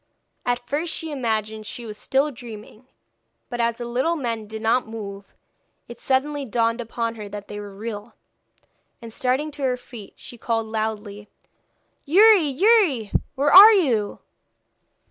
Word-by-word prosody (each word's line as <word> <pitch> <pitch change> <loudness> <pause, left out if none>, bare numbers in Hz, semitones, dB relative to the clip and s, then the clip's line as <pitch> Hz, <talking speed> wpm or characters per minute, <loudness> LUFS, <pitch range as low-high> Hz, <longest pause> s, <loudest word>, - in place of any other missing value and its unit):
At 245 0 -1
first 310 +5 -2
she 325 -1 -5
imagined 220 -5 -3
she 240 - -7
was 215 -2 -7
still 270 +7 0
dreaming; 230 -1 -12 0.6
but 240 -1 -2
as 235 0 +1
the 240 0 -7
little 255 +8 0
men 230 -7 -4
did 220 +1 -8
not 230 +2 +2
move, 200 -3 -9 0.5
it 240 - -11
suddenly 285 +2 0
dawned 230 -1 0
upon 230 0 -3
her 210 -3 -9
that 205 0 -8
they 210 - -7
were 205 -1 -9
real, 215 +1 -7 0.8
and 230 -1 -10
starting 260 +6 -1
to 290 0 -10
her 255 -2 0
feet, 235 -5 -12
she 240 - -12
called 225 -1 -1
loudly: 215 -1 -4 0.7
'Youri! 395 +3 +6
Youri! 310 - +3 0.2
Where 285 +2 +1
are 415 +4 +11
you?' 245 - +1
235 Hz, 150 wpm, -23 LUFS, 220-275 Hz, 0.8 s, are